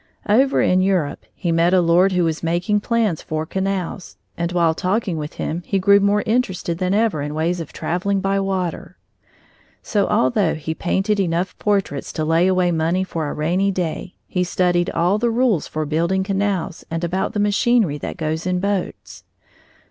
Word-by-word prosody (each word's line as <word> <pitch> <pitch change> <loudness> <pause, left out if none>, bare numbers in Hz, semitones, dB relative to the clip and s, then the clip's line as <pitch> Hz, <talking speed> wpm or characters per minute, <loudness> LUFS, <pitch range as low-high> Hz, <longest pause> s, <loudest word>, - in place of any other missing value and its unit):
Over 260 +6 +3
in 185 0 +3
Europe 185 -7 0
he 175 - -2
met 170 +2 +3
a - - +5
lord 175 +3 +3
who 180 -1 +2
was 160 -1 -1
making 175 +5 0
plans 220 -6 0
for 155 0 -3
canals, 190 0 -3 0.2
and 170 0 -2
while 170 -2 +2
talking 185 +2 -1
with 150 -1 -5
him 165 +3 -3
he 195 - -1
grew 200 +2 +5
more 200 +1 +2
interested 190 -8 -1
than 185 +1 +1
ever 215 -8 +1
in 150 +1 -4
ways 170 +3 0
of 165 - -7
traveling 195 +3 -1
by 195 +1 0
water. 190 -3 -3 0.9
So 205 -3 0
although 160 +8 +2
he 160 +1 -4
painted 195 +5 0
enough 180 0 -1
portraits 195 -9 -1
to 155 - -2
lay 165 +3 +3
away 185 -1 +2
money 165 +3 +1
for 165 -5 -3
a - - -4
rainy 175 +6 +1
day, 180 -1 -3
he 180 - 0
studied 175 -1 +1
all 175 +5 +1
the 240 +1 +1
rules 230 - +1
for 155 0 -3
building 170 +5 0
canals 195 -3 -2
and 165 +1 -3
about 180 +3 -1
the 210 - -1
machinery 205 - +2
that - - -6
goes 160 +2 -2
in 180 0 0
boats. 200 0 -3
180 Hz, 180 wpm, -20 LUFS, 165-195 Hz, 0.9 s, a